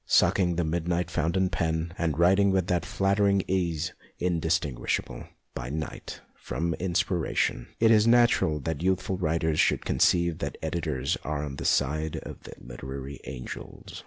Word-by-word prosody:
Suck -, -, +4 dB
ing 90 Hz, -2 st, +2 dB
the 85 Hz, -, 0 dB
midnight 85 Hz, +2 st, -1 dB
fountain 90 Hz, +4 st, +1 dB
pen, 80 Hz, -2 st, -1 dB
and 80 Hz, -5 st, -1 dB
writing 95 Hz, +4 st, +4 dB
with 95 Hz, -2 st, +2 dB
that 90 Hz, -1 st, -1 dB
flattering 100 Hz, 0 st, +2 dB
ease 85 Hz, -4 st, -1 dB, 0.2 s
indistinguishable, 80 Hz, -6 st, -1 dB, 0.3 s
by 65 Hz, -, -5 dB
night, 80 Hz, +2 st, -6 dB
from 85 Hz, 0 st, -3 dB
inspiration, 85 Hz, -7 st, 0 dB
it 115 Hz, 0 st, +5 dB
is 110 Hz, 0 st, +5 dB
natural 120 Hz, -10 st, +4 dB
that 80 Hz, 0 st, -3 dB
youthful 95 Hz, 0 st, 0 dB
writers 80 Hz, -2 st, 0 dB
should -, -, +2 dB
conceive 85 Hz, -1 st, +2 dB
that 70 Hz, -1 st, -4 dB
editors 80 Hz, -5 st, -2 dB
are 75 Hz, +1 st, -2 dB
on 70 Hz, -2 st, -6 dB
the -, -, -5 dB
side 75 Hz, +3 st, +1 dB
of -, -, -8 dB
the -, -, -9 dB
literary 65 Hz, +3 st, -7 dB
angels. 65 Hz, -3 st, -8 dB
85 Hz, 150 wpm, -27 LUFS, 75-90 Hz, 0.3 s, it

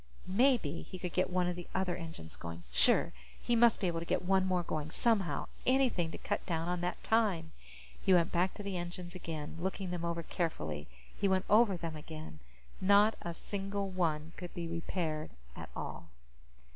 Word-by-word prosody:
Maybe 200 Hz, -, +3 dB
he 185 Hz, -, -8 dB
could 180 Hz, -1 st, -4 dB
get 185 Hz, -, +2 dB
one 180 Hz, -1 st, +2 dB
of 180 Hz, -, -1 dB
the 175 Hz, -1 st, -7 dB
other 185 Hz, -2 st, +1 dB
engines 160 Hz, -, -7 dB
going! 85 Hz, +5 st, -7 dB
Sure. -, -, +4 dB, 0.3 s
He 240 Hz, -, +1 dB
must 235 Hz, -1 st, +6 dB
be -, -, 0 dB
able 170 Hz, -2 st, 0 dB
to 170 Hz, -, -5 dB
get -, -, 0 dB
one 190 Hz, 0 st, +3 dB
more 180 Hz, -1 st, +1 dB
going, 155 Hz, -2 st, -3 dB
somehow. 205 Hz, 0 st, +1 dB, 0.2 s
Anything 255 Hz, -10 st, +3 dB
to -, -, -6 dB
cut 205 Hz, -, -2 dB
down 165 Hz, -2 st, -1 dB
on 180 Hz, 0 st, -1 dB
that 175 Hz, +1 st, -2 dB
time! 195 Hz, -8 st, +2 dB, 0.5 s
He -, -, +3 dB
went 175 Hz, -2 st, +5 dB
back 180 Hz, +2 st, +1 dB
to 205 Hz, -, -7 dB
the 200 Hz, -2 st, -2 dB
engines 175 Hz, 0 st, -5 dB
again, 165 Hz, -4 st, -5 dB
looking 190 Hz, +1 st, -2 dB
them 175 Hz, -1 st, -3 dB
over 170 Hz, 0 st, -1 dB
carefully. 80 Hz, -, -2 dB, 0.3 s
He 200 Hz, -, +1 dB
went 190 Hz, 0 st, +2 dB
over 210 Hz, -3 st, +6 dB
them 165 Hz, -2 st, -4 dB
again. 155 Hz, -, -8 dB, 0.4 s
Not 205 Hz, +3 st, +6 dB
a 170 Hz, -1 st, -4 dB
single 195 Hz, 0 st, -3 dB
one 165 Hz, -4 st, 0 dB
could 175 Hz, -1 st, -7 dB
be 170 Hz, -1 st, -3 dB
repaired 165 Hz, -2 st, -2 dB, 0.3 s
at -, -, -8 dB
all. -, -, -5 dB
180 Hz, 190 wpm, -33 LUFS, 165-195 Hz, 0.5 s, must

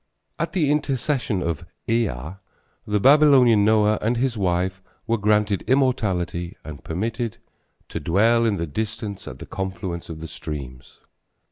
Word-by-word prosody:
At 165 Hz, +1 st, -2 dB
the 155 Hz, -7 st, +2 dB
intercession 135 Hz, -8 st, 0 dB
of 85 Hz, -3 st, -2 dB, 0.2 s
Ea, 115 Hz, -2 st, +2 dB, 0.8 s
the 105 Hz, 0 st, +1 dB
Babylonian 130 Hz, -4 st, +6 dB
Noah 105 Hz, 0 st, +3 dB
and 115 Hz, +3 st, 0 dB
his 125 Hz, 0 st, 0 dB
wife 95 Hz, -1 st, 0 dB, 0.2 s
were 115 Hz, -1 st, 0 dB
granted 105 Hz, -1 st, +2 dB
immortality 95 Hz, -10 st, 0 dB
and 75 Hz, -2 st, -9 dB
permitted 110 Hz, +6 st, -3 dB, 0.5 s
"to -, -, -4 dB
dwell 115 Hz, +7 st, +3 dB
in 110 Hz, -3 st, +2 dB
the 85 Hz, -, -2 dB
distance 100 Hz, +4 st, -5 dB
at -, -, -7 dB
the -, -, -9 dB
confluence 95 Hz, -3 st, -5 dB
of 80 Hz, -1 st, -7 dB
the 80 Hz, -, -6 dB
streams." 65 Hz, -5 st, -8 dB
105 Hz, 140 wpm, -23 LUFS, 90-120 Hz, 0.8 s, Babylonian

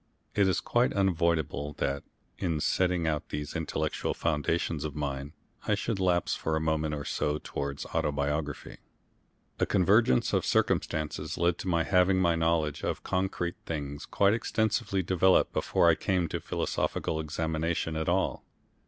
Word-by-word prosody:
It 100 Hz, -2 st, +3 dB
is 95 Hz, -, +1 dB
quite 120 Hz, +1 st, +2 dB
unavoidable 85 Hz, -6 st, +1 dB
that, 70 Hz, 0 st, -1 dB, 0.4 s
in 85 Hz, -5 st, 0 dB
setting 90 Hz, +1 st, +1 dB
out 75 Hz, -2 st, -1 dB
these 75 Hz, 0 st, -5 dB
intellectual 80 Hz, -1 st, -2 dB
foundations 80 Hz, 0 st, 0 dB
of 75 Hz, -2 st, -4 dB
mine, 70 Hz, -1 st, -4 dB, 0.3 s
I 105 Hz, -, +3 dB
should 105 Hz, 0 st, -2 dB
lapse 90 Hz, -2 st, +2 dB
for 80 Hz, -, -1 dB
a -, -, +1 dB
moment 80 Hz, -1 st, 0 dB
or 70 Hz, 0 st, -5 dB
so 75 Hz, +1 st, -1 dB
towards 70 Hz, 0 st, -4 dB
autobiography. 75 Hz, 0 st, -2 dB, 0.8 s
A -, -, +2 dB
convergence 95 Hz, -, +3 dB
of -, -, +2 dB
circumstances 75 Hz, -1 st, 0 dB
led 85 Hz, 0 st, +1 dB
to -, -, -5 dB
my 85 Hz, -2 st, +2 dB
having 90 Hz, +1 st, +3 dB
my 85 Hz, -2 st, +3 dB
knowledge 80 Hz, -2 st, 0 dB
of -, -, -2 dB
concrete 90 Hz, -2 st, -1 dB
things 70 Hz, -3 st, -4 dB
quite 100 Hz, +1 st, +3 dB
extensively 110 Hz, -4 st, 0 dB
developed 95 Hz, +1 st, +3 dB
before -, -, +2 dB
I -, -, +7 dB
came 90 Hz, -3 st, 0 dB
to -, -, -2 dB
philosophical 80 Hz, -, -2 dB
examination 80 Hz, +1 st, -2 dB
at 80 Hz, 0 st, -1 dB
all. -, -, 0 dB
80 Hz, 150 wpm, -29 LUFS, 75-90 Hz, 0.8 s, I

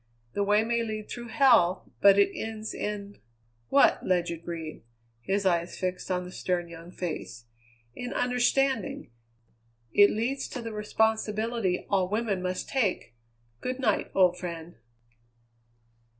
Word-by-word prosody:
The 205 Hz, -, 0 dB
way 210 Hz, +2 st, +3 dB
may 235 Hz, +1 st, 0 dB
lead 215 Hz, -2 st, -4 dB
through 240 Hz, -1 st, -6 dB
hell, 220 Hz, -9 st, +4 dB
but 200 Hz, -1 st, +7 dB
it 200 Hz, -, +3 dB
ends 220 Hz, -1 st, -5 dB
in 205 Hz, -1 st, -5 dB, 0.2 s
" 115 Hz, 0 st, -41 dB
"What?" 280 Hz, -, +4 dB
Ledyard 170 Hz, -2 st, 0 dB
breathed; 165 Hz, -2 st, -6 dB, 0.4 s
his 195 Hz, +7 st, -1 dB
eyes 170 Hz, -1 st, +1 dB
fixed 185 Hz, 0 st, -3 dB
on 180 Hz, -1 st, 0 dB
the 180 Hz, -, -9 dB
stern 180 Hz, -1 st, -2 dB
young 170 Hz, 0 st, -10 dB
face. 160 Hz, -, -6 dB, 0.5 s
"In 245 Hz, -, -6 dB
understanding. 250 Hz, -, 0 dB, 0.8 s
It 205 Hz, 0 st, +7 dB
leads 250 Hz, +5 st, -2 dB
to 250 Hz, -, -6 dB
the 230 Hz, -1 st, -5 dB
responsibility 220 Hz, -1 st, 0 dB
all 190 Hz, -2 st, +1 dB
women 210 Hz, -3 st, -1 dB
must 185 Hz, 0 st, -3 dB
take. 205 Hz, -, -1 dB, 0.5 s
Good 255 Hz, +1 st, -3 dB
night, 220 Hz, -6 st, +1 dB
old 180 Hz, -2 st, +4 dB
friend." 170 Hz, -1 st, -7 dB
200 Hz, 135 wpm, -28 LUFS, 180-225 Hz, 0.8 s, but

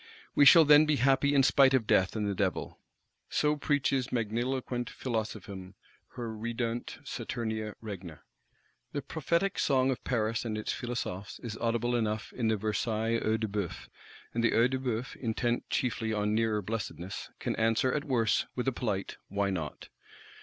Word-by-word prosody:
We 145 Hz, -, +6 dB
shall 165 Hz, +3 st, +9 dB
then 150 Hz, +1 st, +7 dB
be 155 Hz, -, +3 dB
happy 135 Hz, +2 st, +3 dB
in 135 Hz, -, +6 dB
spite 135 Hz, 0 st, +5 dB
of 125 Hz, -4 st, +1 dB
Death 95 Hz, -1 st, +3 dB
and 105 Hz, -1 st, -1 dB
the 100 Hz, -, 0 dB
Devil.—So 100 Hz, -, -2 dB
preaches 140 Hz, -3 st, 0 dB
magniloquent 120 Hz, +1 st, -1 dB
Philosophism 100 Hz, -5 st, -5 dB, 0.4 s
her 115 Hz, -3 st, -4 dB
Redeunt 115 Hz, +1 st, -3 dB
Saturnia 110 Hz, -2 st, -4 dB
regna. 95 Hz, -8 st, -8 dB, 0.7 s
The 145 Hz, -, -3 dB
prophetic 170 Hz, +5 st, 0 dB
song 130 Hz, -1 st, +3 dB
of 130 Hz, -, -4 dB
Paris 115 Hz, -3 st, 0 dB
and 110 Hz, -2 st, -3 dB
its 110 Hz, -, -2 dB
Philosophes 105 Hz, -5 st, -4 dB
is 115 Hz, -2 st, -4 dB
audible 120 Hz, +1 st, 0 dB
enough 110 Hz, -2 st, -1 dB
in 120 Hz, -3 st, -1 dB
the 110 Hz, -1 st, +2 dB
Versailles 110 Hz, +2 st, 0 dB
Œil 110 Hz, +1 st, 0 dB
de 110 Hz, -, 0 dB
Bœuf; 100 Hz, -4 st, -4 dB, 0.4 s
and 115 Hz, -, 0 dB
the 115 Hz, -, +3 dB
Œil 120 Hz, +3 st, +4 dB
de 130 Hz, -, 0 dB
Bœuf, 125 Hz, -1 st, -3 dB
intent 120 Hz, 0 st, -1 dB
chiefly 115 Hz, -4 st, -1 dB
on 105 Hz, 0 st, 0 dB
nearer 110 Hz, -2 st, +1 dB
blessedness, 100 Hz, -3 st, -5 dB
can -, -, -2 dB
answer, 115 Hz, +3 st, +2 dB
at 150 Hz, -, -1 dB
worst, 120 Hz, -7 st, +1 dB
with 125 Hz, +1 st, -2 dB
a -, -, +4 dB
polite 105 Hz, -6 st, -3 dB
'Why 100 Hz, 0 st, 0 dB
not? 80 Hz, -6 st, -5 dB
115 Hz, 160 wpm, -30 LUFS, 105-130 Hz, 0.7 s, shall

